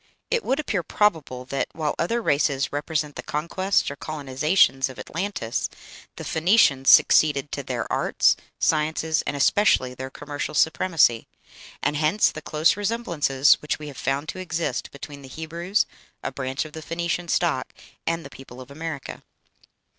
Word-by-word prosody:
It 475 -2 +1
would 270 +3 0
appear 220 -11 -1
probable 160 -11 0
that, 135 +2 -2
while 155 -2 -1
other 230 +8 0
races 140 -3 +1
represent 150 0 -2
the - - -4
conquests 175 +4 0
or - - -6
colonizations 140 -1 +1
of 130 - -11
Atlantis, 165 - -3 0.5
the - - -7
Phoenicians 160 -6 +3
succeeded 145 -2 +5
to 140 - -3
their 125 -3 -3
arts, - - +3 0.2
sciences, 155 0 +1
and - - -1
especially 140 -5 +3
their 130 +1 -6
commercial 145 +2 -5
supremacy; 160 -8 +3 0.6
and 150 - +1
hence 160 +8 +3
the 155 - -8
close 155 +1 +2
resemblances 175 - +2
which 150 -1 -2
we 150 -1 -8
have 140 - -10
found 135 +3 -1
to - - -5
exist 165 -7 -2
between 140 0 -10
the 135 - -11
Hebrews, 170 +7 -1 0.4
a - - -2
branch 130 +2 -3
of 155 - -11
the 160 - -7
Phoenician 170 +2 -3
stock, 160 -6 0 0.4
and 165 -1 -1
the 135 - -10
people 130 -2 -12
of 130 +1 -11
America. 155 -2 -6
150 Hz, 155 wpm, -24 LUFS, 135-170 Hz, 0.6 s, succeeded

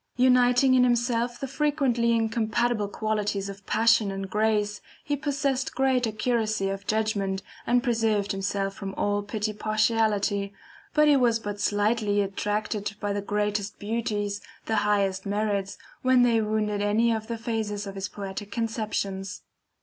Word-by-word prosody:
Uniting 250 +1 +5
in 255 -1 +5
himself 240 0 +1
the 275 - -3
frequently 270 -5 +1
incompatible 225 -1 +1
qualities 210 -1 -2
of 195 0 -9
passion 225 -1 +3
and 195 -1 -5
grace 210 0 +1 0.2
he 290 - -1
possessed 280 -2 -1
great 260 -2 +2
accuracy 215 -2 0
of 195 0 -5
judgment, 205 -3 0 0.2
and 245 0 +3
preserved 225 -4 +1
himself 195 0 -2
from 195 0 -6
all 205 0 0
petty 210 +1 -3
partiality, 215 -2 +1 0.4
but 300 0 +5
he 295 - +6
was 240 -4 +3
but 205 -2 -6
slightly 205 0 +1
attracted 205 +1 -2
by 205 -1 -1
the 205 - -2
greatest 205 0 -2
beauties, 205 -2 -2 0.2
the 220 - 0
highest 195 -2 +1
merits, 200 -1 -1 0.2
when 255 -1 +4
they 230 -2 +3
wounded 210 -1 -1
any 215 +3 +2
of 220 -1 -2
the 230 -1 -3
phases 220 -3 -3
of 195 - -6
his 195 -1 -4
poetic 200 0 -6
conceptions. 210 -4 -3
215 Hz, 145 wpm, -26 LUFS, 205-235 Hz, 0.4 s, he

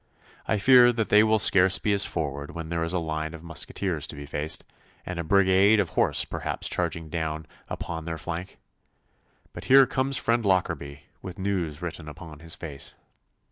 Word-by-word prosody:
'I 110 - +1
fear 120 +3 +6
that 115 -2 -2
they 105 - +6
will 110 0 +3
scarce 95 -2 +5
be 105 - 0
as 100 0 +3
forward 70 -1 -5
when 80 -1 -6
there 85 -1 -2
is 80 - -2
a 90 - 0
line 80 -1 -4
of 80 - -12
musqueteers 85 -1 -2
to - - -6
be 70 0 -8
faced, 75 +2 -2 0.4
and 90 -1 -5
a - - -2
brigade 100 +4 +4
of 95 -5 0
horse - - +2
perhaps - - -3
charging 80 -1 -2
down 80 -1 -4 0.2
upon 80 -1 -6
their 80 -1 -4
flank. 85 +3 -6 1.0
But - - -9
here 135 +1 +7
comes 130 +1 -1
friend 115 0 0
Lockarby, 85 -7 -1 0.2
with 95 -2 -8
news 90 -6 -3
written 80 -2 -6
upon 80 -1 -11
his 85 +1 -4
face. 75 -5 -8
85 Hz, 180 wpm, -25 LUFS, 80-100 Hz, 1.0 s, here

